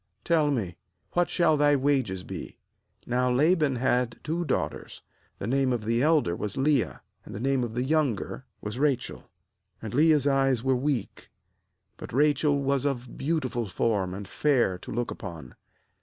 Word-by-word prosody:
tell 160 -3 +2
me, 105 -11 -2 0.3
what 175 0 +1
shall 165 -3 +3
thy 145 0 +4
wages 130 -9 0
be?' - - -8 0.5
16Now 125 0 +1
Laban 155 -2 +3
had 125 -1 0
two 165 +3 -1
daughters: 150 - -3 0.3
the - - -5
name 135 +3 +1
of 120 -4 -2
the 115 +2 +1
elder 150 - +3
was 105 +2 -5
Leah, 135 -2 +1 0.2
and - - -10
the - - -5
name 135 +1 +1
of 115 -1 -4
the 125 - 0
younger 140 -6 0 0.2
was 105 +4 -5
Rachel. 135 -4 0 0.6
17 - - -20
And 110 - -5
Leah's 150 0 +4
eyes 135 -4 +2
were 130 0 +2
weak; 130 -3 -2 0.7
but - - -9
Rachel 145 +1 +2
was 140 -1 +1
of 130 -4 -3
beautiful 130 -7 -1
form 95 -2 -1
and 100 0 -7
fair 120 -8 +1
to - - -9
look 120 +1 -2
upon. 80 - -8
130 Hz, 165 wpm, -27 LUFS, 115-145 Hz, 0.7 s, thy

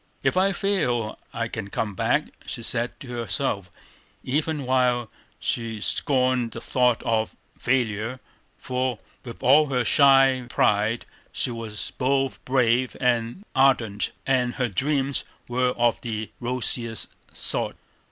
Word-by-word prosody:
"If - - +2
I 190 +2 +3
fail, 125 - 0
I 115 0 -2
can 110 -3 -5
come 105 0 -2
back," - - +1 0.2
she 115 - -5
said 120 +1 -1
to 135 - -9
herself, 115 -4 -2 0.5
even 150 +1 -1
while 125 -2 +2 0.3
she 115 -2 -2
scorned 125 0 +1
the - - -5
thought 125 -2 +1
of 110 -1 0 0.2
failure, 120 -1 0 0.4
for 125 -2 -2 0.3
with 120 -2 -9
all 150 +3 +6
her 125 -3 0
shy 135 0 +5
pride 105 +3 +2 0.3
she - - -1
was 115 -2 -5
both 135 0 0
brave 125 -1 +2
and 120 - 0
ardent, 125 -7 +2
and 125 -2 +1
her 125 -4 0
dreams 135 +5 0 0.2
were 125 +1 +1
of 120 -1 +1
the 110 -2 -4
rosiest 120 -2 -1 0.2
sort. - - -2
125 Hz, 130 wpm, -25 LUFS, 115-130 Hz, 0.5 s, all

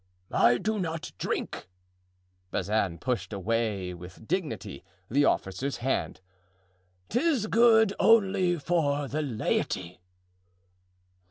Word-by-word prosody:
"I 120 +1 +5
do 215 - -1
not 165 -3 -4
drink"—Bazin 90 +1 -4
pushed 125 +7 -2
away 100 -2 -1
with 90 +5 -12
dignity 115 - -3 0.3
the 145 +3 +4
officer's 125 +9 -1
hand—"'tis 95 - -3
good 220 -2 +5
only 190 -5 +4
for 145 -3 0
the 150 +4 -2
laity." 95 - -2
115 Hz, 85 wpm, -28 LUFS, -, 0.3 s, I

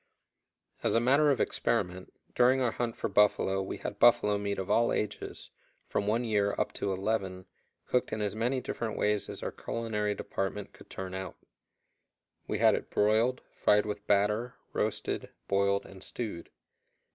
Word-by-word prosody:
As - - +1
a - - +6
matter 140 +5 +4
of 135 - +2
experiment, 95 -5 -1 0.2
during 125 +2 +4
our 125 -3 +2
hunt 120 0 -3
for - - -1
buffalo 100 -2 +3
we 95 - -4
had 100 - -6
buffalo 120 -3 +5
meat 100 0 -2
of 95 - -3
all 115 +3 +3
ages, 105 -1 -4 0.3
from 100 - -2
one 115 +3 +2
year 105 -3 +1
up - - 0
to 100 - -2
eleven, 95 -1 -2 0.4
cooked 125 - 0
in 110 - -2
as 105 0 -1
many 125 +4 0
different 115 -3 -4
ways 105 -1 +1
as - - -7
our - - -2
culinary 105 -3 -2
department 95 +1 -4
could - - -16
turn 95 -1 -6
out. 95 0 -5 1.1
We - - -1
had - - +5
it - - -3
broiled, 110 +5 +2
fried 105 0 +3
with 105 0 -5
batter, 105 +4 +2 0.2
roasted, - - -2 0.2
boiled, 100 0 +2
and 95 -1 -12
stewed. 105 -6 -5
105 Hz, 165 wpm, -30 LUFS, 100-115 Hz, 1.1 s, a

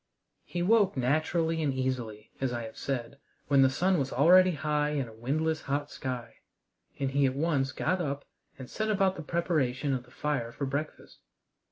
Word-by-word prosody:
He 175 0 -3
woke 205 -3 +3
naturally 160 +5 +1
and 145 -3 +1
easily, 125 -5 -3
as 135 -2 0
I 120 -1 -3
have 110 0 -8
said, 135 0 -4 0.3
when 140 -1 +5
the 135 - +6
sun 180 +7 +2
was 135 -1 -2
already 180 +6 +6
high 150 0 0
in 140 -4 -1
a 110 - -12
windless 155 +8 -1
hot 145 +1 -2
sky, 125 -3 -5 0.6
and 135 -1 -1
he 140 0 +3
at 130 - -2
once 140 -3 +1
got 180 +6 0
up 140 -3 -3 0.3
and 130 -1 -8
set 215 - -2
about 195 -2 +2
the 165 - -6
preparation 150 -5 0
of 130 - -1
the - - -20
fire 130 -4 -2
for 140 +4 -4
breakfast. 140 +3 -5
140 Hz, 185 wpm, -29 LUFS, 130-160 Hz, 0.6 s, the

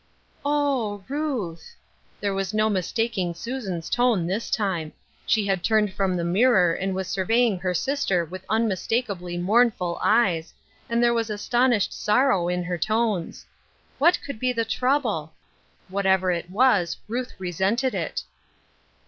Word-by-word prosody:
"Oh, 275 -9 0
Ruth 260 - -3
I" 470 - -16 0.4
There 200 -1 0
was 195 +2 -2
no 215 0 +2
mistaking 190 -1 -1
Susan's 195 -4 -5
tone 240 -8 +2
this 195 +6 -2
time. 175 -7 -1 0.3
She 215 -2 +2
had 190 -3 0
turned 215 -2 +2
from 190 -2 0
the 170 - -1
mirror 185 -1 +4
and 190 +2 -2
was 190 -1 -3
survey 225 +7 +2
ing 205 -6 0
her 180 0 -1
sister 195 - 0
with 185 +3 -9
unmistakably 205 -4 -1
mournful 190 -2 +2
eyes, 190 -8 +2 0.3
and 235 +1 +2
there 235 0 +4
was 230 -1 -1
astonished 240 +1 +1
sorrow 210 -5 +2
in 180 0 -1
her 175 0 -3
tones. 215 -3 -1 0.5
What 340 +5 +5
could 280 -6 -6
be 255 +1 +1
the 230 -2 -1
trouble! 220 - 0 0.5
Whatever 190 -1 +2
it 175 0 -3
was 200 -4 +2
Ruth 245 +3 -4
resented 190 +8 0
it. - - -3
205 Hz, 145 wpm, -24 LUFS, 180-240 Hz, 0.5 s, What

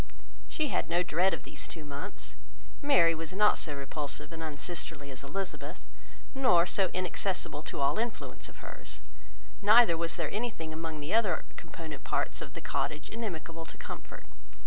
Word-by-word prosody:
She 305 -2 0
had 155 - 0
no 175 +1 +3
dread 180 +3 +3
of - - -3
these - - -6
two 160 -3 -7
months. 140 -5 -6 0.5
Mary 170 -13 +6
was 165 +1 -5
not 210 +2 +5
so 150 -3 -1
repulsive 145 +2 -3
and 165 - -6
unsisterly 155 -1 -3
as 130 +1 -6
Elizabeth, 185 +8 -4 0.5
nor 215 -11 +5
so 190 +1 +3
inaccessible 185 -3 -1
to - - -5
all 140 +6 +3
influence 235 0 -3
of - - -13
hers; - - -8 0.6
neither 215 -2 +8
was 165 0 -1
there 165 -4 -1
anything 210 -8 -2
among 160 -1 -4
the 150 +7 -2
other 210 -7 +3
component 155 -4 -7
parts - - 0
of - - -6
the - - -6
cottage 145 +2 -1
inimical 165 -7 -4
to - - -9
comfort. - - -8
165 Hz, 165 wpm, -32 LUFS, 150-195 Hz, 0.6 s, neither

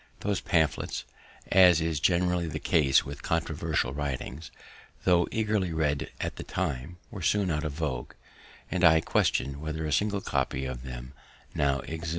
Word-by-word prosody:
Those 100 -2 -1
pamphlets, 80 -3 0 0.5
as 90 -3 +7
is 80 -2 -1
generally 90 +1 +2
the 80 -1 -4
case 75 -3 +3
with 70 +1 -7
controversial 80 -4 -1
writings, 70 +1 -4 0.5
tho' 85 -2 +4
eagerly 105 -5 0
read 75 -3 0
at - - -3
the - - -5
time, 70 +6 -3
were 105 -5 -7
soon 95 +2 +2
out 75 0 -1
of 75 -2 -3
vogue, 70 -6 -3 0.6
and 90 - -1
I 80 -2 +7
question 70 -2 +1
whether 80 +1 -4
a 75 - -2
single 100 +4 +1
copy 65 -7 -1
of 65 -2 -5
them 65 0 -8 0.4
now 70 -2 +1
exists. 80 +1 -5
80 Hz, 160 wpm, -28 LUFS, 70-90 Hz, 0.6 s, as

